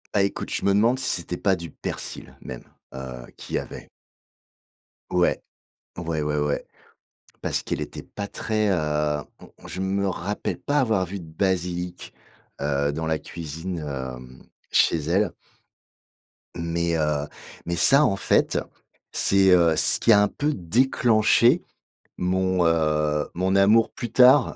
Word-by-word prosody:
Bah, 100 Hz, -, +3 dB
écoute, 100 Hz, -, -3 dB
je -, -, -2 dB
me 100 Hz, -, +4 dB
demande 115 Hz, +6 st, +3 dB
si 130 Hz, -, 0 dB
c'était 90 Hz, +1 st, -5 dB
pas 95 Hz, +1 st, +2 dB
du 85 Hz, -2 st, -8 dB
persil -, -, -6 dB
même, 65 Hz, -2 st, -8 dB, 0.3 s
heu, 65 Hz, -2 st, -7 dB
qu'il -, -, -6 dB
y -, -, +2 dB
avait. -, -, -9 dB, 1.2 s
Ouais, 90 Hz, -1 st, +1 dB, 0.6 s
ouais, 85 Hz, -3 st, -2 dB
ouais, 75 Hz, 0 st, -1 dB
ouais, 75 Hz, 0 st, -1 dB, 0.8 s
parce -, -, -1 dB
qu'elle -, -, -3 dB
était -, -, -6 dB
pas 100 Hz, -1 st, -6 dB
très, 110 Hz, 0 st, -1 dB
heu 75 Hz, -4 st, 0 dB, 0.3 s
mmh, -, -, -16 dB
je 95 Hz, -, -5 dB
me 100 Hz, +1 st, 0 dB
rappelle 95 Hz, +2 st, -3 dB
pas 145 Hz, +1 st, 0 dB
avoir 110 Hz, -8 st, +1 dB
vu 95 Hz, +3 st, -6 dB
de 85 Hz, -, -10 dB
basilic, 90 Hz, +1 st, -2 dB, 0.5 s
heu, 70 Hz, 0 st, 0 dB
dans 80 Hz, +2 st, -3 dB
la 80 Hz, -1 st, 0 dB
cuisine, 85 Hz, +2 st, -6 dB
hem, 65 Hz, -3 st, -7 dB, 0.3 s
chez -, -, +4 dB
elle. 85 Hz, +6 st, 0 dB, 1.2 s
Mais, 85 Hz, 0 st, -1 dB
heu, 75 Hz, -2 st, 0 dB, 0.4 s
mais 85 Hz, -, -2 dB
ça, 140 Hz, -, +5 dB
en 100 Hz, -, +1 dB
fait, -, -, +2 dB, 0.5 s
c'est, 95 Hz, -1 st, +3 dB
heu, 85 Hz, -3 st, +5 dB
ce -, -, +3 dB
qui 115 Hz, -, +4 dB
a 105 Hz, -2 st, +7 dB
un 105 Hz, -, +4 dB
peu 150 Hz, +7 st, -1 dB
déclenché 115 Hz, -, +3 dB, 0.6 s
mon, 95 Hz, 0 st, +1 dB
heu, 75 Hz, -2 st, +1 dB
mon 95 Hz, +2 st, 0 dB
amour 105 Hz, +3 st, +5 dB
plus 120 Hz, -, -6 dB
tard 130 Hz, +1 st, +6 dB
90 Hz, 150 wpm, -24 LUFS, 75-100 Hz, 1.2 s, a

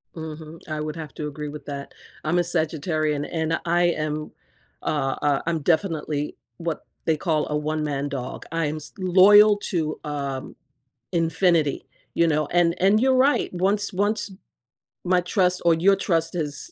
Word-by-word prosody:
Mhm, 160 Hz, 0 st, -8 dB
I 155 Hz, -1 st, -3 dB
would 155 Hz, 0 st, -4 dB
have 155 Hz, -4 st, -7 dB
to 150 Hz, -, -4 dB
agree 150 Hz, 0 st, -6 dB
with 150 Hz, +1 st, -9 dB
that. 140 Hz, -1 st, -7 dB, 0.3 s
I'm 170 Hz, +3 st, +1 dB
a -, -, +5 dB
Sagittarian, 155 Hz, -3 st, -1 dB
and 160 Hz, -1 st, 0 dB
I 175 Hz, +1 st, +2 dB
am, 155 Hz, -3 st, -1 dB, 0.5 s
uh, 135 Hz, -3 st, -1 dB
uh, 145 Hz, -2 st, +2 dB
I'm 165 Hz, -1 st, 0 dB
definitely 155 Hz, -3 st, 0 dB, 0.2 s
what 170 Hz, -2 st, -4 dB, 0.2 s
they 160 Hz, -1 st, +2 dB
call 155 Hz, -2 st, 0 dB
a 150 Hz, -, -1 dB
one-man 150 Hz, -2 st, -2 dB
dog, 130 Hz, -2 st, -5 dB
I 165 Hz, -1 st, 0 dB
am 150 Hz, +1 st, -2 dB
s 150 Hz, -1 st, -10 dB
loyal 205 Hz, +3 st, +7 dB
to, 165 Hz, -6 st, -2 dB
um, 140 Hz, -3 st, -4 dB, 0.6 s
infinity, 165 Hz, -2 st, +1 dB, 0.3 s
you 170 Hz, -, +3 dB
know? 155 Hz, -2 st, +1 dB
And 170 Hz, 0 st, +2 dB
and 195 Hz, +3 st, +5 dB
you're 260 Hz, +2 st, +3 dB
right, 265 Hz, -3 st, +3 dB
once 200 Hz, +3 st, 0 dB
once 205 Hz, +2 st, 0 dB, 0.7 s
my 180 Hz, 0 st, +3 dB
trust 180 Hz, 0 st, +1 dB
or 170 Hz, -, +6 dB
your 185 Hz, +5 st, +4 dB
trust 165 Hz, -3 st, 0 dB
is 155 Hz, -, -4 dB
160 Hz, 160 wpm, -24 LUFS, 150-180 Hz, 0.7 s, loyal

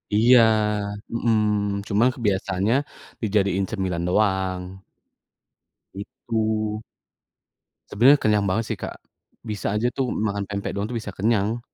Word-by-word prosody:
Iya, 120 Hz, +4 st, +6 dB, 0.7 s
mhm, 105 Hz, -3 st, 0 dB
cuman 110 Hz, +4 st, +3 dB
kebiasaannya 100 Hz, -1 st, 0 dB, 0.5 s
dijadiin 100 Hz, -3 st, +1 dB
cemilan 95 Hz, -5 st, -2 dB
doang. 95 Hz, -2 st, -1 dB, 1.1 s
Gitu. 110 Hz, -1 st, -3 dB, 1.1 s
Sebenarnya 130 Hz, +7 st, +5 dB
kenyang 105 Hz, -1 st, +2 dB
banget 110 Hz, +4 st, 0 dB
sih -, -, -2 dB
Kak. -, -, -7 dB, 0.4 s
Bisa 105 Hz, -3 st, -3 dB
aja 110 Hz, +3 st, +1 dB
tuh 130 Hz, 0 st, -2 dB
makan 100 Hz, -1 st, -2 dB
pempek 100 Hz, 0 st, -4 dB
doang 100 Hz, -, -1 dB
tuh 115 Hz, -, -6 dB
bisa 105 Hz, -, -7 dB
kenyang. 110 Hz, +2 st, 0 dB
105 Hz, 115 wpm, -23 LUFS, 100-110 Hz, 1.1 s, Iya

